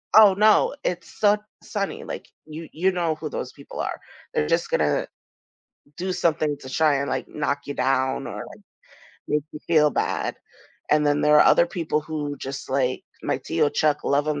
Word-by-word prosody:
oh 210 -3 +9
no, 215 +5 +4
it's 175 -1 -4
su 205 -1 +5 0.3
sunny, 200 -2 -3
like, - - -7 0.2
you 155 +1 -8
you 185 +4 +1
know 170 -3 0
who 155 -1 -6
those - - -5
people - - -11
are, - - -3 0.3
they're 75 - +1
just - - +1
gonna 75 -1 +1 0.9
do 185 +1 -2
something 155 -4 +1
to 130 - -9
try 150 +1 +3
and 140 0 -1
like - - -2
knock 145 -1 -2
you 145 - -4
down 130 0 0
or, - - -6
like, - - -13 0.7
make 150 -1 +1
you 150 - -8
feel 150 -3 +5
bad - - -1 0.6
and 150 0 +4
then 145 0 +2
there 150 0 +5
are - - +7
other 170 - +6
people 165 -3 -1
who 150 -2 -4
just 135 0 -6
like, 130 -1 0 0.2
my - - -1
tio 145 - +1
Chuck, 150 -1 +1
love 145 +1 +2
him 150 -1 -1
150 Hz, 185 wpm, -24 LUFS, 145-170 Hz, 0.9 s, oh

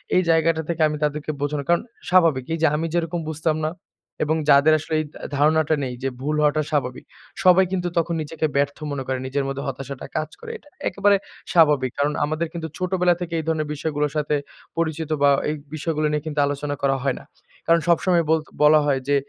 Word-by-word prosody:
এই 185 - +5
জায়গাটা 165 0 +3
থেকে 170 -1 -1
আমি 150 0 -3
তাদেরকে 150 +1 -1
বোঝানো, 145 0 -1
কারণ 175 - +4 0.3
স্বাভাবিক। 165 -8 +4
এই - - 0
যে 160 - +5
আমি 160 +2 -1
যেরকম 170 0 -1
বুঝতাম 155 0 -1
না 155 - -1 0.5
এবং 155 +1 +1
যাদের 145 +2 +6
আসলে 160 - -6
এই 155 - -1
তা - - -12 0.2
ধারণাটা 155 +2 +3
নেই 125 -2 -3
যে 135 - +1
ভুল 150 +3 -1
হওয়াটা 150 +1 +3
স্বাভাবিক। 130 -4 -2 0.4
সবাই 185 +1 +6
কিন্তু 180 -2 -1
তখন 170 0 +1
নিজেকে 160 +1 -3
ব্যর্থ 140 0 +1
মনে 140 -2 -3
করে 130 -1 -1
নিজের 140 +1 -1
মধ্যে 135 0 -4
হতাশাটা 135 0 -6
কাজ 155 0 -2
করে। 465 -1 -7
এটা 295 - -22 0.2
একেবারে 200 0 +3 0.4
স্বাভাবিক। 150 -7 +4
কারণ 145 +1 +2
আমাদের 155 +3 -2
কিন্তু 165 -2 -4
ছোটবেলা 180 -1 +2
থেকে 175 -1 -4
এই - - -3
ধরনের 155 -2 0
বিষয়গুলার 150 -1 -1
সাথে 150 0 0 0.4
পরিচিত 160 -1 -1
বা 145 - +6 0.2
এই 150 - -1 0.2
বিষয়গুলা 155 0 -1
নিয়ে 150 -1 -1
কিন্তু 150 -1 -3
আলোচনা 145 0 -3
করা 135 -1 +3
হয় 135 -2 +1
না। - - -14 0.4
কারণ 165 0 +5
সবসময় 170 0 +3
বল 160 0 +4 0.2
বলা 155 +1 +7
হয়, 140 -2 +2
যে 145 - +3
155 Hz, 200 wpm, -23 LUFS, 145-165 Hz, 0.5 s, বলা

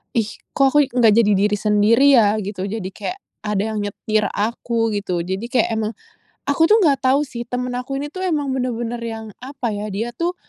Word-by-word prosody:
"Ih 225 -3 +2 0.3
kok 275 - +4
aku 295 -1 +6
nggak 235 -4 +4
jadi 225 -2 +4
diri 210 +1 +2
sendiri 215 +6 +4
ya?" 210 -1 +3
Gitu. 195 -1 -5
Jadi 200 -2 -4
kek 210 - -5 0.3
ada 205 -1 0
yang - - -1
nyetir 215 +1 -1
aku 225 +1 -1
gitu. 185 -4 -2
Jadi 190 +6 -4
kek 245 -2 +1
emang 220 0 -2 0.5
aku 285 +3 +1
tuh 430 +6 +5
nggak 290 -7 +4
tahu 265 +3 +4
sih 235 -2 -6
teman 250 +1 -3
aku 255 +2 -4
ini 290 - -4
tuh 375 +1 -4
emang 295 -6 0
bener-bener 240 -2 -2
yang 225 -1 -5 0.2
apa 265 -3 -4
yah? 210 +1 -4
Dia 225 +4 -2
tuh, 345 +1 0
230 Hz, 200 wpm, -20 LUFS, 210-265 Hz, 0.5 s, aku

